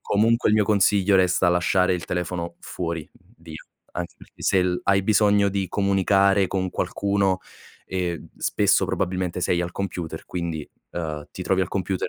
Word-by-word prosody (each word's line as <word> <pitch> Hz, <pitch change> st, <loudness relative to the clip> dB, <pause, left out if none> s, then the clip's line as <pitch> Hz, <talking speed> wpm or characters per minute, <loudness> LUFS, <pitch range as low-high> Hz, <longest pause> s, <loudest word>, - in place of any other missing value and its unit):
comunque 115 Hz, +3 st, +2 dB
il 105 Hz, -, +4 dB
mio 105 Hz, -, +3 dB
consiglio 100 Hz, -1 st, +3 dB
resta 90 Hz, -1 st, +3 dB
lasciare 90 Hz, +1 st, +2 dB
il 85 Hz, -, -4 dB
telefono 85 Hz, -1 st, -3 dB
fuori, 85 Hz, -3 st, -5 dB, 0.3 s
via, 80 Hz, -1 st, -10 dB, 0.3 s
anche 85 Hz, 0 st, -5 dB
perché -, -, -16 dB
se 95 Hz, -2 st, +3 dB
l 90 Hz, -1 st, -1 dB
hai 100 Hz, 0 st, +3 dB
bisogno 105 Hz, -1 st, +4 dB
di 95 Hz, -1 st, -2 dB
comunicare 100 Hz, -1 st, +2 dB
con 95 Hz, -1 st, -1 dB
qualcuno, 100 Hz, -2 st, 0 dB, 0.5 s
ehm, 90 Hz, -3 st, -3 dB
spesso -, -, +2 dB
probabilmente 90 Hz, 0 st, -2 dB
sei 90 Hz, 0 st, +1 dB
al 85 Hz, 0 st, -2 dB
computer, 90 Hz, -3 st, -5 dB
quindi, 85 Hz, -4 st, -4 dB, 0.2 s
ehm, 80 Hz, -3 st, -5 dB
ti -, -, -7 dB
trovi 95 Hz, 0 st, +2 dB
al 90 Hz, -, 0 dB
computer, 95 Hz, -1 st, -2 dB
95 Hz, 160 wpm, -24 LUFS, 85-100 Hz, 0.5 s, il